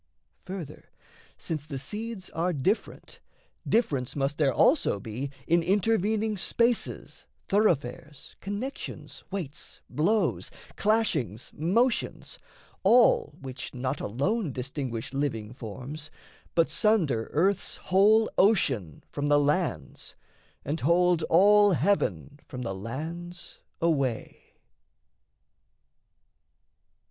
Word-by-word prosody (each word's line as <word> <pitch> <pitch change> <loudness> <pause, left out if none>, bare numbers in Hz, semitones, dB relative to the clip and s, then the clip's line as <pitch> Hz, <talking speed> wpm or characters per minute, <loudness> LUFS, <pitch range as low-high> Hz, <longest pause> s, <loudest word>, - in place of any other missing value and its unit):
Further, 185 -5 -8 0.5
since 155 -2 -5
the 140 -3 -5
seeds 210 - -6
Are 175 +2 0
different, 185 - -2 0.5
difference 140 - +1
must 140 +1 -1
there 140 -3 +3
also 250 - +3
be 115 +7 -5 0.2
In 170 +1 +3
intervening 210 +3 +1
spaces, 235 +5 0 0.2
thoroughfares, 150 - 0
Connections, 205 +8 -6
weights, 175 -8 -6
blows, 205 +9 +1 0.3
clashings, 160 - 0
motions, 220 - 0 0.4
all 240 0 +4
Which 130 -2 -7
not 130 +2 -2
alone 155 - -1
distinguish 130 -2 -4
living 125 -6 -2
forms, 135 +6 -8 0.5
But 165 -2 +3
sunder 165 - +1
earth's 190 +5 +1
whole 210 +4 +4
ocean 135 - +2
from 145 0 -2
the 145 0 +5
lands, 145 - -1 0.5
And 150 +4 -2
hold 175 +3 +3
all 205 +3 +6
heaven 145 - 0
from 125 -1 -6
the 115 - -3
lands 160 - -7 0.2
away. 140 -8 -1
160 Hz, 95 wpm, -27 LUFS, 135-200 Hz, 0.5 s, all